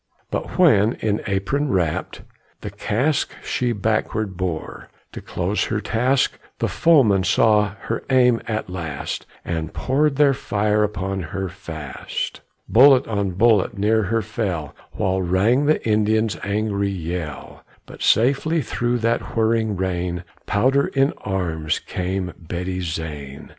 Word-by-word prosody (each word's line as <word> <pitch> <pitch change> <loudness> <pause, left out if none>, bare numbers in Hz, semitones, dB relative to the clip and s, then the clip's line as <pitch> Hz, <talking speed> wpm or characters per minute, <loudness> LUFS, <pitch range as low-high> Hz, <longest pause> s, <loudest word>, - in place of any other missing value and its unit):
But - - -4
when, 115 - +5
in 105 -1 -1
apron 105 +9 0
wrapped, 90 -7 -1 0.4
the - - -6
cask 135 +7 0
She 125 -1 -1
backward 110 -1 -1
bore, 90 -3 -4 0.2
to - - -8
close 90 +4 -1
her 110 - -1
task, 125 +5 +1 0.2
The - - 0
foemen 125 - +4
saw 105 +2 +3
her - - -3
aim 125 -3 +4
at 110 -1 -2
last, 85 -6 -5 0.2
And 80 -2 -3
poured 140 +2 +1
their 145 -1 +5
fire 105 -4 0
upon 95 -2 -2
her 95 +3 -4
fast. 80 -6 -6 0.3
Bullet 130 +2 +6
on 100 -4 -1
bullet 105 +1 +3
near 110 +3 +2
her 115 +3 0
fell, 95 -9 -3 0.2
While 95 0 0
rang 105 +10 +2
the 155 -5 +1
Indians' 110 -1 +2
angry 100 0 0
yell; 85 -5 -5 0.2
But - - -13
safely 140 +7 +2
through 120 0 -1
that 115 0 -1
whirring 110 -1 +2
rain, 90 -1 -2 0.2
Powder 130 +7 +2
in 135 +1 +1
arms, 85 -5 -2
came 90 0 -3
Betty 90 +2 -4
Zane. 75 -5 -6
105 Hz, 130 wpm, -22 LUFS, 90-115 Hz, 0.4 s, Bullet